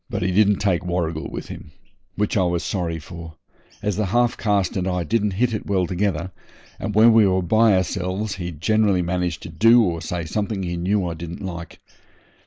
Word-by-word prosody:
He 100 Hz, -5 st, -1 dB
didn't 105 Hz, +2 st, +4 dB
take 95 Hz, -4 st, 0 dB
Warrigal 85 Hz, -3 st, -2 dB
with -, -, -7 dB
him, 75 Hz, -, -10 dB, 0.4 s
which 105 Hz, 0 st, -1 dB
I 100 Hz, -, +3 dB
was 85 Hz, -2 st, 0 dB
sorry 85 Hz, -4 st, -2 dB
for, 80 Hz, 0 st, -10 dB, 0.5 s
as 105 Hz, -2 st, -1 dB
the 105 Hz, -2 st, 0 dB
half 120 Hz, +4 st, +2 dB
caste 100 Hz, -3 st, 0 dB
and 95 Hz, -1 st, -1 dB
I 90 Hz, -1 st, -1 dB
didn't 105 Hz, +3 st, 0 dB
hit 115 Hz, +4 st, +1 dB
it 110 Hz, -, -4 dB
well 95 Hz, -3 st, +1 dB
together, 90 Hz, -1 st, -2 dB, 0.5 s
and 105 Hz, -, -4 dB
when 115 Hz, +2 st, +7 dB
we 110 Hz, -2 st, +6 dB
were 95 Hz, -1 st, +1 dB
by 110 Hz, +3 st, +4 dB
ourselves 95 Hz, +2 st, -2 dB
he 90 Hz, -2 st, -4 dB
generally 100 Hz, +3 st, +1 dB
managed 90 Hz, -1 st, -2 dB
to -, -, -7 dB
do 115 Hz, +8 st, +5 dB
or 85 Hz, -5 st, -1 dB
say 85 Hz, 0 st, -4 dB
something 100 Hz, +3 st, -2 dB
he 85 Hz, -1 st, -3 dB
knew 95 Hz, +3 st, 0 dB
I 85 Hz, -, -3 dB
didn't 85 Hz, +3 st, -7 dB
like. 85 Hz, -2 st, -7 dB
95 Hz, 195 wpm, -22 LUFS, 85-105 Hz, 0.5 s, when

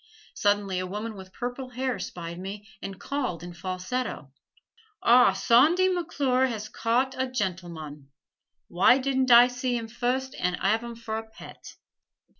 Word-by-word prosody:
Suddenly 205 Hz, -2 st, +1 dB
a 185 Hz, -, -3 dB
woman 210 Hz, +4 st, -5 dB
with 190 Hz, -1 st, -11 dB
purple 245 Hz, +4 st, -5 dB
hair 255 Hz, 0 st, -2 dB
spied 170 Hz, 0 st, -6 dB
me 200 Hz, +3 st, -7 dB
and 195 Hz, -1 st, -7 dB
called 250 Hz, -, -3 dB
in 175 Hz, 0 st, -8 dB
falsetto: 185 Hz, -, -4 dB, 0.7 s
"Ah, 245 Hz, +1 st, +6 dB
Sawndy 320 Hz, +11 st, +4 dB
McClure 275 Hz, -7 st, +1 dB
has 215 Hz, -3 st, -5 dB
caught 245 Hz, +4 st, 0 dB
a 260 Hz, -, 0 dB
gen'l'mon. 170 Hz, -, -5 dB, 0.6 s
Why 185 Hz, +8 st, +5 dB
didn't 265 Hz, -1 st, 0 dB
I 240 Hz, 0 st, +9 dB
see 245 Hz, 0 st, -2 dB
'im 230 Hz, -1 st, -5 dB
fust 255 Hz, +3 st, -2 dB
an' 180 Hz, 0 st, 0 dB
'arve 220 Hz, +5 st, +1 dB
'im 235 Hz, -1 st, -7 dB
fer 225 Hz, -1 st, -5 dB
a 220 Hz, 0 st, -7 dB
pet?" -, -, -12 dB
230 Hz, 150 wpm, -27 LUFS, 185-255 Hz, 0.7 s, I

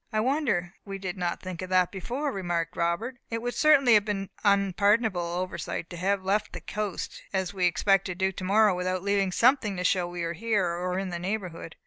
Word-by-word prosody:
"I 215 Hz, -, 0 dB
wonder 235 Hz, -, 0 dB
we 195 Hz, -1 st, -6 dB
did 190 Hz, -1 st, -5 dB
not 175 Hz, -2 st, -2 dB
think 185 Hz, -2 st, -6 dB
of 185 Hz, -, -5 dB
that 185 Hz, -1 st, +3 dB
before," 250 Hz, -, -3 dB
remarked 175 Hz, -, -2 dB
Robert. 170 Hz, +10 st, -1 dB
"It 230 Hz, -, -2 dB
would 245 Hz, 0 st, -2 dB
certainly 280 Hz, -6 st, +5 dB
have 210 Hz, -1 st, +6 dB
been 200 Hz, -2 st, -3 dB
an 200 Hz, -1 st, +4 dB
unpardonable 205 Hz, 0 st, +2 dB
oversight 170 Hz, -1 st, -4 dB
to 175 Hz, -, -6 dB
have 195 Hz, +2 st, 0 dB
left 200 Hz, +3 st, 0 dB
the -, -, -5 dB
coast, 210 Hz, -3 st, -4 dB
as 190 Hz, -1 st, -1 dB
we 185 Hz, -2 st, +2 dB
expect 195 Hz, +2 st, +2 dB
to 185 Hz, -, -4 dB
do 190 Hz, +1 st, +1 dB
tomorrow, 200 Hz, +3 st, +3 dB
without 185 Hz, 0 st, -2 dB
leaving 200 Hz, -1 st, +1 dB
something 230 Hz, -2 st, +3 dB
to 180 Hz, -, -2 dB
show 180 Hz, -1 st, +2 dB
that 175 Hz, -, -9 dB
we 175 Hz, -1 st, -3 dB
are 170 Hz, 0 st, -2 dB
here, 210 Hz, +1 st, 0 dB
or 180 Hz, +1 st, -2 dB
in 195 Hz, 0 st, -2 dB
the 175 Hz, -1 st, -4 dB
neighbourhood." 180 Hz, -4 st, -4 dB
190 Hz, 215 wpm, -27 LUFS, 180-210 Hz, -, have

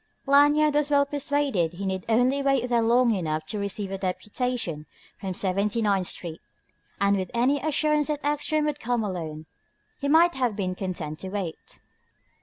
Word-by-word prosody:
Lanyard 290 Hz, +2 st, +5 dB
was 295 Hz, 0 st, +1 dB
well 285 Hz, -1 st, +4 dB
persuaded 280 Hz, -, 0 dB
he 195 Hz, +3 st, -5 dB
need 190 Hz, -1 st, -3 dB
only 250 Hz, +5 st, +3 dB
wait 275 Hz, -3 st, +1 dB
there 240 Hz, -1 st, +2 dB
long 235 Hz, +1 st, +3 dB
enough 155 Hz, -5 st, -2 dB
to 210 Hz, +6 st, -4 dB
receive 200 Hz, 0 st, -3 dB
a 195 Hz, -, -4 dB
deputation 190 Hz, -, -3 dB, 0.3 s
from 190 Hz, -2 st, -4 dB
Seventy 200 Hz, +5 st, 0 dB
ninth 200 Hz, -4 st, +1 dB
Street. 165 Hz, -2 st, -5 dB, 0.6 s
And 200 Hz, +1 st, +3 dB
with 185 Hz, -2 st, -3 dB
any 260 Hz, +5 st, +2 dB
assurance 300 Hz, 0 st, +1 dB
that 295 Hz, -1 st, -3 dB
Ekstrom 295 Hz, +1 st, +1 dB
would 295 Hz, -1 st, -2 dB
come 240 Hz, -2 st, -1 dB
alone, 160 Hz, -6 st, -5 dB, 0.5 s
he 280 Hz, -, -2 dB
might 335 Hz, +4 st, +5 dB
have 250 Hz, -5 st, 0 dB
been 185 Hz, -3 st, -2 dB
content 175 Hz, -5 st, -5 dB
to 190 Hz, -, -6 dB
wait. 190 Hz, -5 st, -6 dB
225 Hz, 170 wpm, -26 LUFS, 185-280 Hz, 0.6 s, Lanyard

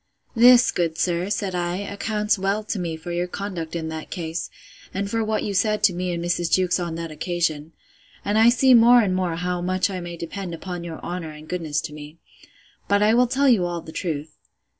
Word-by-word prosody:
This, 245 Hz, +2 st, +7 dB
good 165 Hz, -2 st, -1 dB
sir, 175 Hz, +1 st, 0 dB
said 200 Hz, -2 st, -2 dB
I, 175 Hz, 0 st, -1 dB
accounts 210 Hz, +1 st, -1 dB
well 195 Hz, +3 st, 0 dB
to 210 Hz, -1 st, -3 dB
me 165 Hz, -2 st, -3 dB
for 165 Hz, +2 st, -7 dB
your 175 Hz, +1 st, -1 dB
conduct 180 Hz, -4 st, -5 dB
in 160 Hz, -1 st, -3 dB
that 160 Hz, -1 st, -6 dB
case, 165 Hz, -2 st, -4 dB, 0.5 s
and 200 Hz, +1 st, -1 dB
for 225 Hz, +2 st, -1 dB
what 215 Hz, 0 st, -1 dB
you 205 Hz, -, -2 dB
said 210 Hz, +2 st, +1 dB
to 185 Hz, -, +5 dB
me 180 Hz, +1 st, -2 dB
and 170 Hz, 0 st, -3 dB
Mrs. 175 Hz, -1 st, 0 dB
Jewkes 185 Hz, -1 st, +2 dB
on 170 Hz, -2 st, -3 dB
that 165 Hz, -1 st, -5 dB
occasion: 165 Hz, -2 st, -2 dB, 0.5 s
And 205 Hz, +2 st, +2 dB
I 225 Hz, +1 st, +7 dB
see 255 Hz, +2 st, +5 dB
more 240 Hz, +1 st, +7 dB
and 190 Hz, -4 st, 0 dB
more 180 Hz, -3 st, -1 dB
how 180 Hz, +1 st, -2 dB
much 185 Hz, +2 st, 0 dB
I 185 Hz, -, -4 dB
may 175 Hz, -1 st, -7 dB
depend 170 Hz, +1 st, -5 dB
upon 175 Hz, +1 st, -6 dB
your 165 Hz, -2 st, -7 dB
honour 175 Hz, -2 st, -5 dB
and 155 Hz, 0 st, -11 dB
goodness 160 Hz, -4 st, -2 dB
to 150 Hz, -, -7 dB
me.—But 160 Hz, +6 st, -5 dB
I 215 Hz, +1 st, +4 dB
will 245 Hz, +1 st, +4 dB
tell 275 Hz, +3 st, +2 dB
you 230 Hz, -8 st, +4 dB
all 175 Hz, -1 st, -3 dB
the 160 Hz, -, -11 dB
truth. 155 Hz, -3 st, -5 dB
180 Hz, 215 wpm, -23 LUFS, 170-205 Hz, 0.5 s, This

